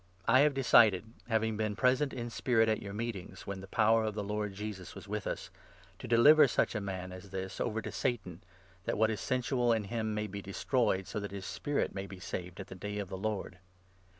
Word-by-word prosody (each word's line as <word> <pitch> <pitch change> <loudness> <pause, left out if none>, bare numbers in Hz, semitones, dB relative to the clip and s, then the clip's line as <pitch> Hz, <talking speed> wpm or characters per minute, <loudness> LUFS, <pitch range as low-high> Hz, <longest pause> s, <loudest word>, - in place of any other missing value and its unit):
I 130 +3 +6
have 145 +1 +5
4 - - -15
decided 115 -7 +6 0.2
— - - -27
having 110 -1 +1
been 110 -1 -1
present 130 +4 +2
in 120 -2 -5
spirit 115 -2 +2
at 110 -1 +1
your 100 - -6
meetings, 100 -4 -5
when 100 -1 -5
the 95 - -9
power 110 +2 +3
of 110 -1 -2
the 105 - -2
Lord 105 0 -3
Jesus 105 -3 -6
was - - -10
with 105 -1 -3
us - - -4 0.2
— - - -26
to - - -7
deliver 145 +6 +7
such - - +1
a 105 - -2
man 95 -2 -5
5 90 - -7
as - - -15
this 95 0 -5
over 110 -1 -1
to - - -5
Satan, 95 -9 -2 0.4
that - - -1
what 110 +1 +3
is 105 -4 -3
sensual 125 -1 +1
in 110 -2 +2
him 110 +1 -2
may 105 0 -1
be 100 -1 -6
destroyed, 100 0 0
so 105 - -4
that 100 0 -4
his 100 -1 -7
spirit 145 +8 -1
may 95 0 -5
be 95 -1 -10
saved 90 0 -6
at 95 - -5
the - - -10
Day 105 +3 -5
of 100 -3 -4
the - - -4
Lord. 100 -2 -3
105 Hz, 240 wpm, -32 LUFS, 95-115 Hz, 0.4 s, deliver